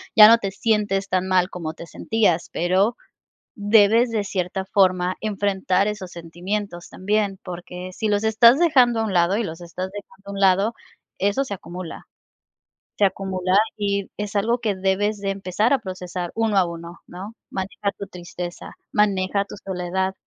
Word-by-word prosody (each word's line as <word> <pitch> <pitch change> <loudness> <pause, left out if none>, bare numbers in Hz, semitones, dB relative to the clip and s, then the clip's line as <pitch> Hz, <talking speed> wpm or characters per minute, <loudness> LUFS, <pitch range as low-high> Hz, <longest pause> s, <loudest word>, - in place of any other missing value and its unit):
ya 215 -2 +11
no 230 +1 +7
te 200 -3 -2
sientes 205 -1 0
tan 185 0 0
mal 185 0 +2
como 160 -3 -5
te 170 - -9
sentías, 205 -7 0
pero 190 +7 +2 0.6
debes 220 +3 +5
de 215 -2 0
cierta 190 -1 -3
forma 185 -2 +3
enfrentar 200 -2 0
esos 195 -4 -5
sentimientos 175 +2 -5
también 200 0 -1
porque 180 0 -7
si 220 +4 -3
los 205 0 +1
estás 235 +4 +6
dejando 255 -9 +4
a - - +1
un 200 - -3
lado 175 +2 +3
y 230 - 0
los 165 -2 -6
estás 180 +2 -5
dejando 200 0 -11
a - - -4
un 200 - -5
lado, 195 +3 +3 0.4
eso 205 +8 +1
se 200 -7 -5
acumula, 180 -1 -8 0.9
se 205 - +4
acumula 190 -1 0 0.2
y 200 -1 -1
es 210 0 -5
algo 225 +4 +1
que 220 -4 -1
debes 195 +3 0
de 195 -1 -1
empezar 195 +4 0
a 275 - +4
procesar, 180 -4 -6
uno 225 -3 +1
a 190 - +5
uno, 170 0 -8
¿no? 195 +5 -9 0.2
Maneja 195 +1 -3
tu 200 - -7
tristeza, 175 -1 -7 0.2
maneja 200 -1 +1
tu - - -10
soledad. 190 0 -2
195 Hz, 170 wpm, -23 LUFS, 185-210 Hz, 0.9 s, ya